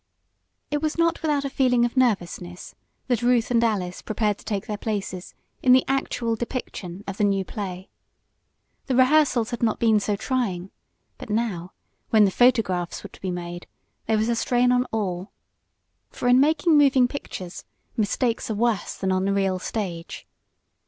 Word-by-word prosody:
It 295 0 0
was 310 0 -1
not 335 0 +2
without 295 -3 0
a - - -1
feeling 250 -3 +3
of 240 - -3
nervousness 180 -7 -1 0.3
that 245 -3 0
Ruth 240 -1 +2
and 235 -1 +3
Alice 190 -6 -1
prepared 210 -1 -1
to - - -15
take 200 -2 -2
their 215 - -3
places 195 -4 -4 0.3
in 250 - +5
the 255 - +5
actual 245 -4 -1
depiction 210 -6 -5
of 195 0 -6
the - - 0
new 195 -1 +1
play. 190 -4 -6 1.0
The 260 - 0
rehearsals 255 -3 +4
had 240 - -4
not 225 -2 +1
been 220 -2 +4
so 205 0 -1
trying; 200 -6 -2 0.5
but - - -9
now, 210 -5 -2 0.4
when 215 -2 +6
the 195 - +1
photographs 195 -8 +2
were - - -8
to - - -17
be 190 - -3
made, 175 0 -6 0.4
there 220 - +2
was 215 +1 +1
a 235 - +1
strain 245 +1 +2
on 250 0 +2
all. 195 -5 -3 0.8
For 245 - -4
in 250 +1 +6
making 310 +3 +3
moving 270 -3 +5
pictures 190 -9 -7 0.3
mistakes 230 +2 0
are 220 - -1
worse 230 -1 0
than 190 -1 -1
on 185 0 +1
the 200 - +1
real 195 -2 +1
stage. 180 -5 -5
220 Hz, 170 wpm, -24 LUFS, 190-250 Hz, 1.0 s, when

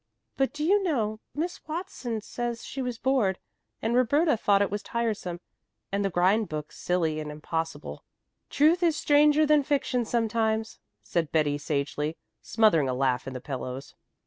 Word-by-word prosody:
But, 270 -1 +1
do 295 +2 -4
you 400 +6 +4
know, 225 - -1 0.2
Miss 340 +4 -3
Watson 305 - -4
says 240 +2 -4
she 275 - -5
was 250 -2 -3
bored, 245 -8 +1 0.5
and 225 +1 +1
Roberta 285 +5 +3
thought 200 -2 +3
it 200 - -2
was 205 0 -2
tiresome 215 -8 -2 0.5
and 200 +1 0
the 195 - +1
grind 190 +5 +2
book 150 -1 -5
silly 165 -3 -1
and 150 -1 -5
impossible." 155 0 -4 0.5
"Truth 320 +5 +4
is 330 -3 +2
stranger 300 +1 +4
than 300 -1 +5
fiction 270 -3 0
sometimes," 220 -1 0 0.2
said 165 -3 -1
Betty 145 -2 +1
sagely, 150 +2 -2 0.2
smothering 205 - +3
a 125 - -1
laugh 130 -1 0
in 135 - -5
the - - -3
pillows. 130 0 -6
220 Hz, 160 wpm, -27 LUFS, 160-270 Hz, 0.5 s, than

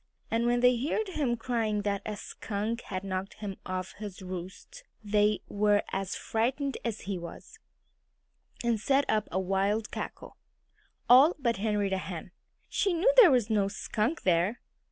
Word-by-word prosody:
And 230 +1 +1
when 240 0 +2
they 250 -1 +4
heard 400 +8 -1
him 280 -9 0
crying 225 -3 -1
that 200 -1 -1
a 210 -1 -4
skunk 220 +4 -4
had 185 0 -5
knocked 190 0 -4
him 200 -3 -6
off 185 0 -3
his 205 -3 -7
roost 185 - -8 0.2
they 210 0 +2
were 205 0 +2
as 195 0 -2
frightened 265 +5 -1
as 230 -3 -3
he 195 -2 -4
was, 170 -1 -10 1.0
and 235 -2 +1
set 275 +5 +2
up 215 -1 +1
a 185 - 0
wild 195 +3 0
cackle. - - -7 0.7
All 270 +8 +7
but 235 -6 0
Henrietta 205 -2 0
Hen! 180 -1 -7 0.4
She 390 - +1
knew 375 +10 +3
there - - +9
was 245 -5 +2
no 205 -2 +3
skunk 215 +8 -2
there. 180 +5 +2
210 Hz, 155 wpm, -29 LUFS, 195-245 Hz, 1.0 s, there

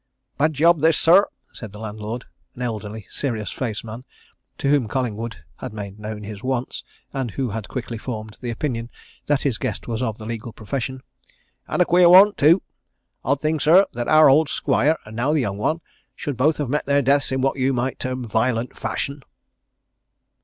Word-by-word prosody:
"Bad 155 +2 +3
job, 165 +3 +4
this, 160 +1 +4
sir!" 185 +5 +6 0.3
said 110 -4 -9
the - - -9
landlord, 110 +2 -6 0.3
an 125 - -5
elderly, 110 -2 -5
serious 110 -8 -2
faced 115 -5 -3
man, 115 +3 -8 0.5
to - - -2
whom 140 -5 +3
Collingwood 115 -2 -3
had - - -7
made 100 -1 -7
known 105 0 -6
his 105 -1 -8
wants, 130 -1 -3 0.3
and 135 -3 -2
who 125 +1 -3
had 110 -1 -5
quickly 120 -3 -5
formed 110 -3 -6
the 125 - -4
opinion 115 -1 -3 0.4
that 145 -1 +1
his 130 -6 0
guest - - -3
was 115 0 -2
of 110 -4 -2
the 110 - -9
legal 115 0 -5
profession. 130 +3 -4 0.6
"And 180 - +2
a - - -6
queer 175 0 +5
one, 195 +3 +8
too! 165 +4 +4 0.6
Odd 140 +2 0
thing, 155 0 0
sir, 175 +7 +6
that 120 0 -3
our 155 0 +7
old 140 +2 +5
squire, 155 +3 +2
and 110 +1 -10
now 130 +6 +1
the 155 - +2
young 100 -4 -3
one, 160 +10 0 0.3
should 145 - -4
both 150 +6 +2
have 145 - -2
met 145 +3 -1
their 140 0 +3
deaths 140 +2 +3
in 130 0 0
what 135 +1 0
you 130 +1 +2
might 125 0 -2
term 130 -1 -3
violent 115 +2 0
fashion." 140 0 -3
130 Hz, 190 wpm, -22 LUFS, 110-145 Hz, 0.6 s, one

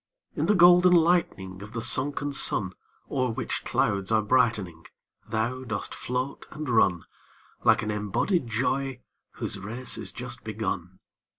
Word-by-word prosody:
In - - -1
the 210 - +4
golden 180 0 +7
lightning 160 - +1
Of 105 +3 -10
the 115 - -3
sunken 140 +3 +1
sun, 95 -8 +1 0.4
O'er 130 -2 0
which 115 - -3
clouds 100 +1 0
are 110 -1 +3
brightening, 105 -8 +1 0.4
Thou 120 +4 -2
dost 110 -5 -4
float 125 +2 -4
and 155 0 -7
run, 95 -7 +3 0.6
Like - - +4
an 105 - -2
embodied 105 - -1
joy 130 +3 -1 0.3
whose 100 - -5
race 115 +6 -2
is 100 -4 -5
just 125 0 -7
begun. 100 -4 -4
115 Hz, 140 wpm, -26 LUFS, 105-135 Hz, 0.6 s, golden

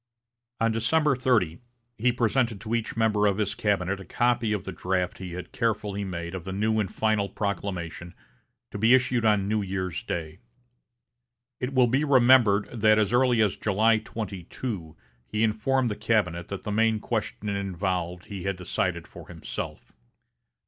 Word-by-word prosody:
On 115 0 +2
December 135 +6 +2
30, 115 -11 +1 0.4
he 120 +3 +3
presented 120 -2 +1
to 110 +2 -5
each 115 -1 -1
member 110 -2 +3
of 100 -1 +1
his 105 -3 0
cabinet 95 -2 0
a - - -8
copy 120 +3 +1
of 105 -4 -2
the 95 - -4
draft 90 0 -2
he 90 -2 -6
had 90 +1 -7
carefully 105 -3 -1
made 85 -2 -5
of 95 -3 -5
the 95 - -6
new 110 +3 +1
and 100 -3 -1
final 110 -2 0
proclamation 90 -4 -4 0.6
to 100 - -5
be 115 +4 +6
issued 125 -2 +1
on 105 -3 +3
New 105 +1 +1
Year's 95 -2 -3
day. 80 -2 -5 1.2
It 130 +2 -3
will 130 -1 +6
be 130 +5 +1
remembered 125 -7 +5
that 110 0 +5
as 110 +1 +1
early 120 -2 +4
as 105 - 0
July 110 +2 +3
22, 95 -4 -6 0.3
he 105 - -1
informed 115 +3 +1
the - - -2
cabinet 85 -8 0
that 100 - -6
the 105 - -3
main 110 +1 +2
question 110 -1 -3
involved 90 -3 -2
he 100 -3 -7
had 95 -1 0
decided 90 -1 -2
for - - -12
himself. - - -7
105 Hz, 165 wpm, -26 LUFS, 95-115 Hz, 1.2 s, be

